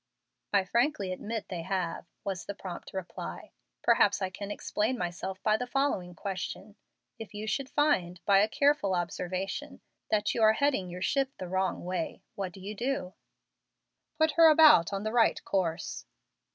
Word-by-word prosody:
"I 195 Hz, -2 st, +3 dB
frankly 235 Hz, -2 st, +1 dB
admit 220 Hz, +3 st, -5 dB
they 175 Hz, -3 st, -4 dB
have," 180 Hz, -1 st, -3 dB, 0.2 s
was 190 Hz, -3 st, -4 dB
the 205 Hz, -, -4 dB
prompt 185 Hz, -3 st, -8 dB
reply. 190 Hz, -2 st, -6 dB, 0.3 s
"Perhaps -, -, +4 dB
I 190 Hz, -2 st, -2 dB
can 200 Hz, +1 st, -6 dB
explain 215 Hz, +4 st, -1 dB
myself 180 Hz, 0 st, -4 dB
by 215 Hz, 0 st, +3 dB
the 250 Hz, -, -4 dB
following 245 Hz, -10 st, -1 dB
question: 195 Hz, +3 st, -5 dB, 0.4 s
If 220 Hz, -1 st, -9 dB
you 215 Hz, +1 st, -5 dB, 0.2 s
find, 190 Hz, -, +1 dB
by 195 Hz, -1 st, +6 dB
a 210 Hz, -, +4 dB
careful 280 Hz, -6 st, +2 dB
observation, 185 Hz, -, -3 dB, 0.3 s
that 210 Hz, -1 st, +1 dB
you 230 Hz, -, -1 dB
are 220 Hz, 0 st, +7 dB
heading 260 Hz, -8 st, +1 dB
your 180 Hz, +1 st, -5 dB
ship 270 Hz, +5 st, +1 dB
the 185 Hz, -, -6 dB
wrong 190 Hz, 0 st, -1 dB
way, 180 Hz, -2 st, -3 dB
what 195 Hz, -2 st, -4 dB
do 190 Hz, -, -13 dB
you 200 Hz, +3 st, -6 dB
do?" 235 Hz, -4 st, -2 dB, 1.0 s
"Put 315 Hz, 0 st, +3 dB
her 330 Hz, +1 st, +7 dB
about 305 Hz, -, +7 dB
on 195 Hz, 0 st, -3 dB
the 215 Hz, +1 st, -2 dB
right 230 Hz, -2 st, +4 dB
course." 175 Hz, -3 st, -2 dB
200 Hz, 165 wpm, -30 LUFS, 185-235 Hz, 1.0 s, are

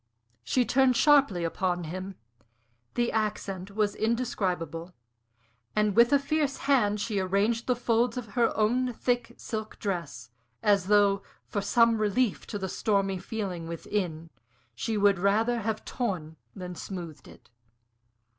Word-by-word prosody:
She 245 Hz, -, +1 dB
turned 265 Hz, 0 st, +3 dB
sharply 280 Hz, -, +4 dB
upon 175 Hz, +1 st, -1 dB
him. 185 Hz, +4 st, -6 dB, 0.8 s
The 240 Hz, 0 st, +1 dB
accent 200 Hz, -3 st, -3 dB
was 210 Hz, -2 st, +1 dB
indescribable. 185 Hz, -8 st, -2 dB, 0.8 s
And 210 Hz, -2 st, +2 dB
with 235 Hz, +1 st, +6 dB
a 285 Hz, -, +6 dB
fierce 280 Hz, 0 st, 0 dB
hand 210 Hz, -7 st, +3 dB
she 205 Hz, -1 st, -1 dB
arranged 200 Hz, +5 st, 0 dB
the 250 Hz, -, +3 dB
folds 240 Hz, +1 st, +1 dB
of 235 Hz, -4 st, -5 dB
her 235 Hz, +2 st, +2 dB
own 245 Hz, +4 st, +2 dB
thick 245 Hz, 0 st, -1 dB
silk 220 Hz, -1 st, -5 dB
dress, 170 Hz, -, -4 dB, 0.3 s
as 200 Hz, -3 st, +3 dB
though, 200 Hz, -1 st, +4 dB, 0.2 s
for 205 Hz, -, -3 dB
some 230 Hz, +2 st, +3 dB
relief 215 Hz, +2 st, 0 dB
to 210 Hz, -, -4 dB
the 190 Hz, -1 st, -3 dB
stormy 195 Hz, -1 st, 0 dB
feeling 185 Hz, -6 st, -4 dB
within, 165 Hz, -1 st, -3 dB, 0.4 s
she 220 Hz, -, -2 dB
would 200 Hz, -2 st, +4 dB
rather 220 Hz, +5 st, +2 dB
have 220 Hz, 0 st, -3 dB
torn 180 Hz, -11 st, -3 dB, 0.2 s
than 180 Hz, -1 st, -6 dB
smoothed 170 Hz, -6 st, -7 dB
it. -, -, -17 dB
205 Hz, 135 wpm, -28 LUFS, 185-235 Hz, 0.8 s, with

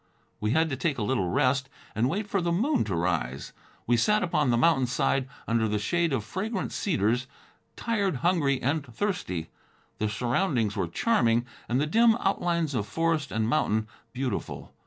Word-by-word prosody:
We 105 Hz, -, -1 dB
had 160 Hz, +7 st, +3 dB
to -, -, 0 dB
take 140 Hz, +2 st, -1 dB
a 110 Hz, -, -1 dB
little 105 Hz, -6 st, 0 dB
rest, 135 Hz, +8 st, +1 dB, 0.2 s
and 115 Hz, +4 st, +1 dB
wait 200 Hz, +7 st, -2 dB
for 200 Hz, -2 st, 0 dB
the 170 Hz, 0 st, 0 dB
moon 245 Hz, -, +2 dB
to 95 Hz, -, -2 dB
rise. 70 Hz, -5 st, -2 dB, 0.3 s
We 120 Hz, 0 st, +3 dB
sat 210 Hz, -, +3 dB
upon 150 Hz, -6 st, +1 dB
the 120 Hz, -, +3 dB
mountain 135 Hz, -1 st, +3 dB
side, 130 Hz, +1 st, 0 dB, 0.2 s
under 115 Hz, 0 st, +2 dB
the 105 Hz, 0 st, 0 dB
shade 170 Hz, +11 st, 0 dB
of 130 Hz, -6 st, 0 dB
fragrant 190 Hz, -, -3 dB
cedars, 125 Hz, -, 0 dB, 0.5 s
tired, 205 Hz, -7 st, 0 dB
hungry 145 Hz, -7 st, +2 dB
and 145 Hz, +4 st, +1 dB
thirsty. 120 Hz, -, -3 dB, 0.5 s
The 105 Hz, -, 0 dB
surroundings 120 Hz, -, 0 dB
were -, -, -1 dB
charming 120 Hz, -, +2 dB, 0.2 s
and 125 Hz, +2 st, +2 dB
the 145 Hz, -, +2 dB
dim 225 Hz, +8 st, +4 dB
outlines 170 Hz, -, 0 dB
of 105 Hz, -5 st, -1 dB
forest 165 Hz, +4 st, 0 dB
and 110 Hz, 0 st, 0 dB
mountain 110 Hz, -5 st, +1 dB, 0.2 s
beautiful. 130 Hz, +1 st, -4 dB
135 Hz, 175 wpm, -27 LUFS, 115-175 Hz, 0.5 s, dim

